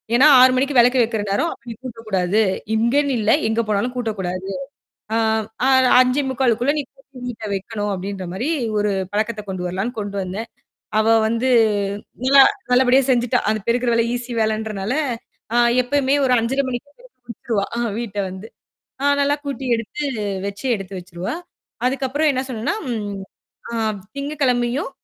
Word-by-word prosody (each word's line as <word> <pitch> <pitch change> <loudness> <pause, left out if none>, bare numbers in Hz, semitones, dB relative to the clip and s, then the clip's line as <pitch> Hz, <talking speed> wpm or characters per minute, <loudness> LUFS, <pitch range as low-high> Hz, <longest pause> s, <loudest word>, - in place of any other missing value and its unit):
"ஏன்னா 265 +5 +7
6 255 0 +8
மணிக்கு 270 +1 +1
வெளக்கு 250 +1 +5
வைக்கிற 220 -2 -2
நேரம் 260 +12 0
நீ - - -5
கூட்டக் 230 -3 -9
கூடாது. 190 +1 +1 0.4
இங்கேன்னு 265 +6 +2
இல்ல, 215 0 +2 0.2
எங்க 220 +1 +1
போனாலும் 215 +4 0
கூட்டக் 225 -4 -3
கூடாது. 185 0 -3 0.7
ஆ - - +2 0.9
5:45குள்ள 255 -1 +1
நீ - - -2
கூட்டி 270 -1 -16
வீட்ட 225 -3 -6
வைக்கணும்" 205 +1 -3
அப்படின்ற 190 0 -5
மாரி 240 +11 -2 0.3
ஒரு 205 0 +1 0.2
பழக்கத்தை 215 +1 -1
கொண்டு 185 -1 -4
வரலாம்ன்னு, 195 +7 -3
கொண்டு 205 -1 -5
வந்தேன். 195 +5 -5 0.5
அவ 215 - +2 0.2
வந்து 230 +3 0 0.7
நல்லா 275 +2 +6 0.3
நல்லபடியா 255 +1 +5
செஞ்சுட்டா. 245 0 +2
அந்தப் 215 -2 -3
பெருக்கிற 240 +1 +2
வேலை 230 0 +2
ஈஸி 245 0 -5
வேலைன்றனால 215 0 -1 0.6
அ - - +3 0.3
எப்பவுமே 275 +1 +1
ஒரு 255 - +2
5:30 265 +5 0
மணிக்கு 255 +3 -5 0.4
கூட்டிருவா 225 -2 -2
அ - - 0 0.2
வீட்ட 220 -4 -5
வந்து. 190 +3 -8 0.6
அ - - -1 0.2
நல்லா 285 +1 +3
கூட்டி, 275 -2 -4
எடுத்து, 230 +6 -4 0.4
வச்சு, 200 +6 -5
எடுத்து 195 -1 -8
வச்சிருவா. 175 0 -6 0.5
அதுக்கப்புறம் 270 +3 0
என்ன 260 -1 -1
சொன்னேன்னா, 230 - -2 0.2
ம் 215 +1 -5 0.2
"திங்ககிழமையும், 275 -3 0
235 Hz, 145 wpm, -21 LUFS, 210-260 Hz, 0.9 s, 6